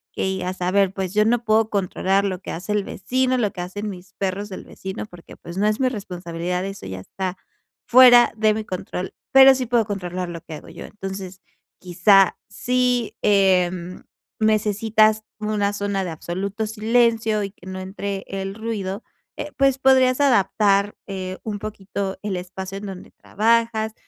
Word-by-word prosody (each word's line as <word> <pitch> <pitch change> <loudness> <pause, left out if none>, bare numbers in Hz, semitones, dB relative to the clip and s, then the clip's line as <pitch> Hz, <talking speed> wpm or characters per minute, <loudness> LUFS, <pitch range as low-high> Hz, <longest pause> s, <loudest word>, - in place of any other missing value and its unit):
que - - -3
digas 185 -1 -3
a 180 - +1
ver, 195 0 +2
pues 190 -2 -3
yo 210 0 +4
no 235 +1 +2
puedo 220 0 +2
controlar 195 0 +1
lo 185 -2 -2
que - - -7
hace 180 +5 -5
el 210 -1 +1
vecino, 255 +7 -1
lo 210 -4 +1
que 180 - -6
hacen 205 +4 -5
mis 185 -1 -10
perros 195 +1 -2
del 185 - -7
vecino, 190 +2 -7
porque 175 -4 -14
pues 170 +2 -10
no 205 - +1
es 215 +1 +1
mi 260 -1 +2
responsabilidad, 180 -4 -4
eso 195 0 -8
ya 95 0 -6
está 185 - -5 0.5
fuera 245 -1 +8
de 215 0 +3
mi 220 +1 -3
control. 185 -1 -5 0.2
Pero 270 0 +8
sí 255 -1 -2
puedo 235 -2 +2
controlar 185 -3 -4
lo 170 -1 -7
que 160 - -10
hago 150 - -10
yo. - - -9
Entonces, 190 -2 -7 0.4
quizás 190 +2 +5 0.2
si, 250 -2 0
em, 185 -3 +2 0.4
necesitas 215 0 +2 0.2
una 210 -1 0
zona 200 -1 -2
de 175 - -4
absoluto 195 +6 -4
silencio 225 0 +2
y 200 - -3
que 190 - -19
no 185 0 -6
entre 195 +1 -5
el 195 0 -4
ruido, 210 -2 -4 0.3
eh, 295 0 -6
pues 275 -1 +3
podrías 260 0 +4
adaptar, 205 -5 +3
eh, 190 -1 -5
un 210 -2 -4
poquito 200 -2 -5
el 200 -3 -3
espacio 185 +2 -6
en 205 - -7
donde 190 -2 -8
trabajas, 225 0 0
200 Hz, 175 wpm, -22 LUFS, 185-220 Hz, 0.5 s, fuera